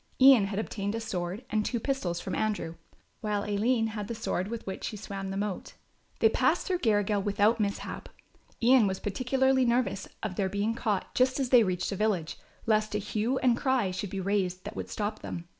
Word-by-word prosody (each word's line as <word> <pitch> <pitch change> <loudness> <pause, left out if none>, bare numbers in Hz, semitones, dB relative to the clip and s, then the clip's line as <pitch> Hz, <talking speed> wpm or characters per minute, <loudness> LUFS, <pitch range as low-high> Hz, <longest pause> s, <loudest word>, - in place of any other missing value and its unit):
Ian 260 -6 +8
had 195 0 -4
obtained 205 -1 -2
a - - -2
sword 195 0 -4
and 215 0 +2
two 235 +2 -1
pistols 215 -10 -1
from 190 - -5
Andrew, 210 -6 -1 0.5
while 210 -2 -1
Aline 225 +3 +1
had 210 -2 -5
the 235 - -4
sword 200 -4 -2
with 230 +1 -5
which 190 - -5
she 215 - -4
swam 195 -1 -5
the 195 - -3
moat. 205 -1 -3 0.5
They - - +7
passed - - +2
through 365 -2 0
Garrigill 205 - +2
without 205 +3 +2
mishap. 200 -1 -3 0.5
Ian 245 -2 +6
was 190 -1 -2
particularly 260 +5 +1
nervous 235 -5 +1 0.2
of 200 -4 -3
their 195 -2 +1
being 205 +3 0
caught 215 -4 -2
just 255 +2 +2
as 265 -3 0
they 245 -2 +7
reached 185 -3 0
a - - -2
village, 195 -6 -1 0.3
lest 215 -1 +1
a - - +3
hue 215 +5 -1
and 245 -2 +5
cry 255 -7 +1
should 185 +2 -4
be 195 - -4
raised 185 -2 -1
that - - -7
would - - -5
stop 215 0 -3
them. 170 - -6
210 Hz, 205 wpm, -29 LUFS, 195-235 Hz, 0.5 s, Ian